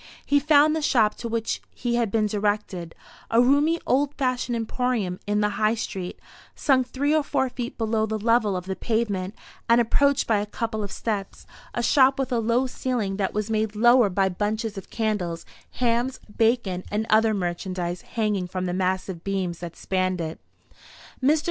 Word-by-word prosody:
He 285 Hz, -, +3 dB
found 300 Hz, +1 st, +5 dB
the 320 Hz, -, -1 dB
shop 225 Hz, -7 st, +3 dB
to 235 Hz, -, -5 dB
which 230 Hz, -1 st, -2 dB
he 240 Hz, -1 st, -2 dB
had 235 Hz, -2 st, +1 dB
been 215 Hz, +1 st, +1 dB
directed 205 Hz, -5 st, -2 dB, 0.3 s
a 230 Hz, -, +3 dB
roomy 285 Hz, +7 st, +4 dB
old 285 Hz, +2 st, +1 dB
fashioned 255 Hz, -2 st, -1 dB
emporium 225 Hz, -5 st, -1 dB
in 210 Hz, 0 st, +1 dB
the 210 Hz, -, +2 dB
High 215 Hz, +1 st, +3 dB
street, 190 Hz, -5 st, -5 dB, 0.4 s
sunk 260 Hz, -4 st, +2 dB
three 285 Hz, +4 st, 0 dB
or 310 Hz, -, +4 dB
four 265 Hz, -2 st, 0 dB
feet 245 Hz, -1 st, -6 dB
below 220 Hz, -1 st, 0 dB
the 220 Hz, 0 st, -2 dB
level 220 Hz, -2 st, +2 dB
of 180 Hz, -, -6 dB
the 190 Hz, 0 st, -3 dB
pavement, 210 Hz, -4 st, -1 dB, 0.3 s
and 235 Hz, +1 st, +6 dB
approached 280 Hz, +4 st, +3 dB
by 220 Hz, -3 st, +2 dB
a 205 Hz, -, -3 dB
couple 220 Hz, +1 st, -3 dB
of 200 Hz, -2 st, -4 dB
steps; 205 Hz, -4 st, -4 dB, 0.3 s
a 240 Hz, -, -1 dB
shop 265 Hz, +1 st, +5 dB
with 270 Hz, -1 st, -2 dB
a 240 Hz, -, +2 dB
low 235 Hz, +3 st, +2 dB
ceiling, 245 Hz, -6 st, -2 dB
that 195 Hz, -1 st, -1 dB
was 210 Hz, +1 st, -1 dB
made 215 Hz, -1 st, 0 dB
lower 240 Hz, 0 st, +5 dB
by 195 Hz, +1 st, +2 dB
bunches 210 Hz, +3 st, -2 dB
of 195 Hz, -, -8 dB
candles, 205 Hz, -7 st, -2 dB, 0.3 s
hams, 245 Hz, +1 st, 0 dB, 0.2 s
bacon, 225 Hz, -6 st, +1 dB
and 210 Hz, +2 st, -1 dB
other 220 Hz, 0 st, +4 dB
merchandise 175 Hz, -1 st, -3 dB
hanging 210 Hz, -5 st, -1 dB
from 185 Hz, 0 st, -3 dB
the 175 Hz, -, -2 dB
massive 185 Hz, -1 st, -2 dB
beams 190 Hz, -4 st, -2 dB
that 175 Hz, -1 st, -7 dB
spanned 185 Hz, -1 st, -1 dB
it. 160 Hz, -1 st, -4 dB, 0.8 s
Mr. 300 Hz, +4 st, +4 dB
220 Hz, 180 wpm, -25 LUFS, 195-245 Hz, 0.8 s, and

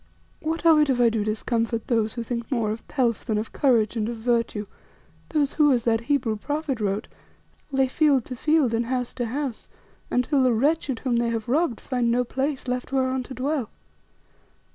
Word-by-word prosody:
"What 325 Hz, +2 st, -3 dB
of 320 Hz, -2 st, +7 dB
it 300 Hz, -1 st, +3 dB
if 255 Hz, -2 st, +2 dB
I 240 Hz, -1 st, +5 dB
do 220 Hz, -2 st, -1 dB
discomfort 225 Hz, +1 st, -1 dB
those 225 Hz, -3 st, +1 dB
who 235 Hz, -, -4 dB
think 235 Hz, -1 st, -4 dB
more 230 Hz, -5 st, +1 dB
of 220 Hz, +1 st, -7 dB
pelf 240 Hz, -5 st, 0 dB
than 220 Hz, -3 st, -1 dB
of 215 Hz, +1 st, -4 dB
courage 235 Hz, -6 st, +2 dB
and 220 Hz, -1 st, -1 dB
of 235 Hz, -, -4 dB
virtue; 230 Hz, -2 st, 0 dB, 0.6 s
those 290 Hz, -3 st, +1 dB
who, 295 Hz, -2 st, +4 dB
as 245 Hz, -3 st, +2 dB
that 225 Hz, -1 st, +2 dB
Hebrew 250 Hz, -7 st, +1 dB
prophet 290 Hz, +1 st, -3 dB
wrote, 205 Hz, +1 st, -1 dB, 0.6 s
lay 270 Hz, -1 st, +2 dB
field 275 Hz, -2 st, +2 dB
to 255 Hz, -, -6 dB
field 300 Hz, -2 st, +2 dB
and 230 Hz, +1 st, 0 dB
house 250 Hz, -1 st, -2 dB
to 245 Hz, -2 st, -3 dB
house, 265 Hz, 0 st, -4 dB, 0.4 s
until 265 Hz, +3 st, +2 dB
the 255 Hz, -2 st, +4 dB
wretched 275 Hz, +1 st, +1 dB
whom 250 Hz, -3 st, 0 dB
they 235 Hz, 0 st, +1 dB
have 225 Hz, -1 st, -3 dB
robbed 270 Hz, -2 st, +1 dB
find 250 Hz, -3 st, -1 dB
no 245 Hz, +1 st, +2 dB
place 265 Hz, +2 st, -3 dB
left 250 Hz, +1 st, -3 dB
whereon 260 Hz, -1 st, +1 dB
to 260 Hz, +1 st, -8 dB
dwell? 270 Hz, -3 st, -1 dB
250 Hz, 195 wpm, -25 LUFS, 230-275 Hz, 0.6 s, of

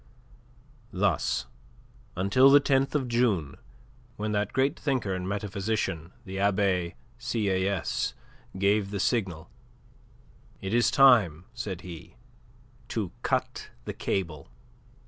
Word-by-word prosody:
Thus 95 Hz, 0 st, 0 dB, 0.7 s
until 100 Hz, +9 st, +5 dB
the 140 Hz, +1 st, +8 dB
10th 135 Hz, 0 st, +1 dB
of 135 Hz, -4 st, +1 dB
June, 115 Hz, -, +1 dB, 0.6 s
when 105 Hz, 0 st, -2 dB
that 105 Hz, 0 st, 0 dB
great 135 Hz, +2 st, +1 dB
thinker 130 Hz, -9 st, -1 dB
and 95 Hz, 0 st, -3 dB
metaphysician, 100 Hz, -4 st, -2 dB
the 95 Hz, 0 st, -5 dB
Abbe 95 Hz, -, +1 dB, 0.2 s
Sieyes, 100 Hz, -4 st, -1 dB, 0.4 s
gave 100 Hz, +1 st, +2 dB
the 100 Hz, -1 st, -3 dB
signal: 95 Hz, -8 st, -1 dB, 1.1 s
"It 95 Hz, +2 st, -4 dB
is 120 Hz, 0 st, +4 dB
time," 105 Hz, -, +5 dB
said 105 Hz, -7 st, -5 dB
he, 85 Hz, 0 st, -10 dB, 0.7 s
"to 105 Hz, -6 st, -3 dB
cut -, -, -2 dB, 0.2 s
the -, -, -4 dB
cable." 80 Hz, -7 st, -3 dB
100 Hz, 105 wpm, -28 LUFS, 95-115 Hz, 1.1 s, the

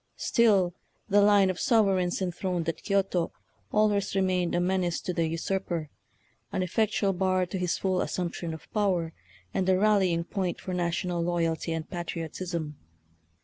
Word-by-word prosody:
Still 200 Hz, -7 st, +3 dB, 0.4 s
the 205 Hz, +1 st, +5 dB
line 200 Hz, -2 st, +5 dB
of 180 Hz, -, -8 dB
sovereigns 195 Hz, -6 st, +2 dB
enthroned 180 Hz, -1 st, -2 dB
at 165 Hz, -, -2 dB
Kioto 195 Hz, -4 st, 0 dB, 0.4 s
always 210 Hz, -2 st, +2 dB
remained 185 Hz, -2 st, +1 dB
a -, -, +2 dB
menace 180 Hz, -1 st, 0 dB
to 180 Hz, -, -3 dB
the 165 Hz, -1 st, +1 dB
usurper, 165 Hz, -2 st, -2 dB, 0.6 s
an 185 Hz, -, 0 dB
effectual 200 Hz, +1 st, +1 dB
bar 185 Hz, 0 st, +1 dB
to 180 Hz, +2 st, -4 dB
his 180 Hz, -1 st, 0 dB
full 185 Hz, -1 st, 0 dB
as -, -, -2 dB
sumption 170 Hz, -2 st, -3 dB
of 160 Hz, -1 st, -9 dB
power, 185 Hz, -6 st, +1 dB, 0.4 s
and 190 Hz, 0 st, 0 dB
a 185 Hz, -, +4 dB
rallying 190 Hz, -5 st, +3 dB
point 185 Hz, -1 st, -3 dB
for 185 Hz, -, -5 dB
national 175 Hz, 0 st, -1 dB
loyalty 165 Hz, -1 st, 0 dB
and 165 Hz, -1 st, -3 dB
patriotism. 170 Hz, -2 st, -4 dB
180 Hz, 150 wpm, -28 LUFS, 170-195 Hz, 0.6 s, the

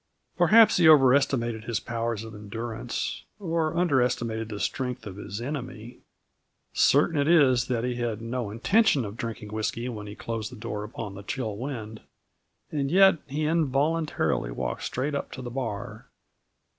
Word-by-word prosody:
Perhaps 210 Hz, +6 st, +6 dB
he 170 Hz, -2 st, +5 dB
over 135 Hz, -5 st, +7 dB
estimated 120 Hz, -5 st, +1 dB
his 115 Hz, -2 st, -1 dB
powers 115 Hz, -2 st, -3 dB
of 110 Hz, -1 st, -9 dB
endurance, 110 Hz, +3 st, -5 dB
or 165 Hz, -4 st, -1 dB
under 160 Hz, -7 st, +3 dB
estimated 115 Hz, -2 st, -1 dB
the 105 Hz, -2 st, -5 dB
strength 125 Hz, -1 st, -3 dB
of 100 Hz, -2 st, -8 dB
his 100 Hz, 0 st, -6 dB
enemy. 125 Hz, -3 st, -6 dB, 0.7 s
Certain 150 Hz, +3 st, +4 dB
it 140 Hz, -, +1 dB
is 130 Hz, -7 st, +5 dB
that 120 Hz, -2 st, -1 dB
he 125 Hz, -1 st, -2 dB
had 115 Hz, -3 st, -2 dB
no 115 Hz, -1 st, -3 dB
intention 140 Hz, -, +2 dB
of 100 Hz, +1 st, -7 dB
drinking 110 Hz, -3 st, -5 dB
whisky 110 Hz, +3 st, -2 dB
when 105 Hz, -3 st, -6 dB
he 105 Hz, -, -8 dB
closed 115 Hz, -2 st, -4 dB
the -, -, -9 dB
door 105 Hz, -2 st, -5 dB
upon 105 Hz, -1 st, -6 dB
the 100 Hz, -, -8 dB
chill 110 Hz, 0 st, -4 dB
wind; 110 Hz, -3 st, -6 dB, 0.7 s
and 140 Hz, -3 st, -1 dB
yet, 190 Hz, 0 st, +6 dB
he 150 Hz, +2 st, -2 dB
involuntarily 155 Hz, -, +1 dB
walked -, -, -4 dB
straight 140 Hz, +4 st, -2 dB
up 140 Hz, -, -3 dB
to 130 Hz, -, -7 dB
the 120 Hz, -, -6 dB
bar. 115 Hz, -3 st, -5 dB
120 Hz, 165 wpm, -27 LUFS, 110-145 Hz, 0.7 s, over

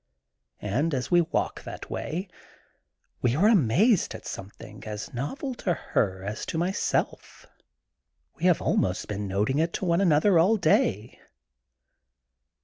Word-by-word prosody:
And, 140 Hz, +10 st, 0 dB
as 130 Hz, +5 st, -3 dB
we 175 Hz, 0 st, +6 dB
walk 165 Hz, -, -2 dB
that -, -, -9 dB
way, 175 Hz, +6 st, -4 dB, 0.9 s
we 120 Hz, 0 st, +2 dB
are 190 Hz, +8 st, +4 dB
amazed 200 Hz, -, +3 dB
at -, -, -10 dB
something 105 Hz, +2 st, -9 dB
as 105 Hz, 0 st, -6 dB
novel 255 Hz, -, -4 dB
to 175 Hz, -3 st, +1 dB
her 95 Hz, -9 st, -1 dB
as 105 Hz, +2 st, -5 dB
to -, -, -3 dB
myself. 180 Hz, +4 st, -2 dB, 0.9 s
We 170 Hz, -, -5 dB
have 180 Hz, -3 st, +5 dB
been -, -, -6 dB
al -, -, +2 dB
most 95 Hz, +3 st, -1 dB
noting 105 Hz, +6 st, -1 dB
it 165 Hz, +1 st, 0 dB
to -, -, -3 dB
one 170 Hz, +1 st, +2 dB
another 170 Hz, +1 st, +4 dB
all 200 Hz, +7 st, +4 dB
day. 155 Hz, -, +1 dB
155 Hz, 140 wpm, -26 LUFS, -, 0.9 s, we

